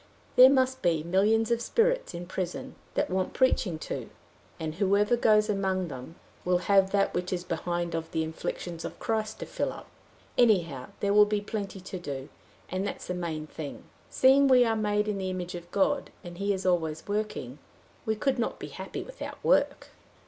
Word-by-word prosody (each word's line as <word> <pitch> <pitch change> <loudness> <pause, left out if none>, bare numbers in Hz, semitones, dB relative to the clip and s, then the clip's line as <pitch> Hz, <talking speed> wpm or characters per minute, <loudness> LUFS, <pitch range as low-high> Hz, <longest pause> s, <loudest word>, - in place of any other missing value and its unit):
There 255 +1 +10
must 260 -1 +2
be 165 -3 +2
millions 210 +6 +2
of 235 0 +2
spirits - - +1
in 175 +1 -5
prison 180 0 -4 0.2
that - - 0
want 185 0 -1
preaching 215 -10 +2
to; - - -5 0.5
and 160 -1 -3
whoever 200 +5 +3
goes 215 -3 +4
among 190 -3 0
them 130 +4 -8 0.3
will 180 0 +3
have 195 -1 +5
that 200 0 +1
which 180 0 -2
is 180 -1 -2
behind 175 0 -2
of 165 0 -3
the 160 0 -1
afflictions 165 +1 -5
of - - -6
Christ 220 -1 -2
to - - -3
fill - - -2
up. - - -10 0.5
Anyhow 175 - +3
there 200 0 +2
will 210 0 +7
be 210 0 0
plenty 205 -2 -5
to 185 0 -6
do, 140 -5 -6 0.4
and 190 +2 -2
that's - - -6
the 180 - -3
main 165 -3 -3
thing. 150 -1 -8 0.3
Seeing 270 +2 +5
we 255 -2 +6
are 225 -1 +1
made 210 -1 +1
in 205 -2 -1
the 190 -1 -2
image 180 -1 -4
of 175 -1 -8
God, 205 +10 +1
and 175 -1 -9
he 200 +1 +1
is 190 -1 -2
always 160 -4 0
working, 205 - -3 0.4
we 220 -2 0
could 260 +3 0
not 230 - -1
be - - -7
happy - - -6
without - - -8
work." - - +2
190 Hz, 190 wpm, -28 LUFS, 175-215 Hz, 0.5 s, There